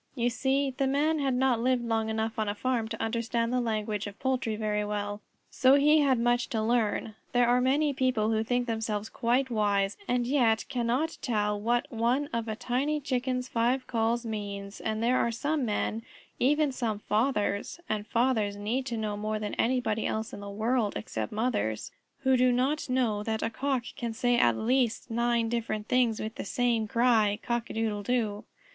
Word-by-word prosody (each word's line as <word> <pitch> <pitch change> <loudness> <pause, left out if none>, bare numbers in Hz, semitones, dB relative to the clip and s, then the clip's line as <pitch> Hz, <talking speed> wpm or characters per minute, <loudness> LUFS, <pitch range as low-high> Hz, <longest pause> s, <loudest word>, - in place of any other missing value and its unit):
You 240 -1 +1
see 270 +2 +1
the 270 0 +1
Man 300 +4 +1
had 270 -3 +1
not 255 -2 +2
lived 250 0 +1
long 225 -1 0
enough 220 0 -2
on 215 -1 0
a 205 - -2
farm 240 -1 -1
to 225 0 -6
understand 230 +1 -1
the 250 - +2
language 215 -3 -2
of 205 +1 -10
poultry 255 -4 0
very 210 -1 -1
well, 205 0 -3 0.3
so 260 +1 +5
he 300 +2 +5
had 275 -3 +3
much 240 +1 +1
to 225 -5 -1
learn. 220 -1 0 0.2
There 245 -1 +4
are 245 +1 +4
many 285 +3 +2
people 255 -5 +1
who 220 0 +1
think 245 +2 0
themselves 220 -2 -2
quite 250 +2 0
wise 205 -3 +1
and 245 -1 +1
yet 240 -4 +2
cannot 255 +5 -1
tell 210 -3 0
what 240 +2 +1
one 245 +5 0
of 230 -1 -2
a 220 - -2
tiny 255 +6 -1
Chicken's 255 -2 -1
five 250 +2 +1
calls 235 0 0
means, 200 -2 -5
and 220 0 -2
there 250 +2 +3
are - - +2
some 285 +4 -1
Men, 220 +1 -1 0.4
even 295 +2 +3
some 235 -5 -2
fathers 210 +4 0
(and 215 -1 -2
fathers 230 -4 +1
need 230 +6 -2
to 235 - -3
know 215 -1 -2
more 215 +1 -2
than 210 -1 -4
anybody 230 -3 0
else 220 0 -3
in - - -6
the 200 0 -7
world, 220 +1 0
except 110 +1 -4
mothers) 210 - -1 0.3
who 265 -1 +3
do 255 0 +4
not 265 +4 0
know 240 -5 +1
that 220 +1 -2
a 225 - -1
Cock 265 +1 -1
can 235 -4 -4
say 245 +2 +1
at 120 - +3
least 245 0 0
nine 235 0 +1
different 225 -2 -2
things 245 -3 +2
with 215 +1 -4
the - - -3
same 230 0 0
cry, 225 -3 +3
"Cock 235 -1 -2
a - - -6
doodle 220 -2 -1
doo!" 215 -2 -1
235 Hz, 190 wpm, -29 LUFS, 215-255 Hz, 0.4 s, so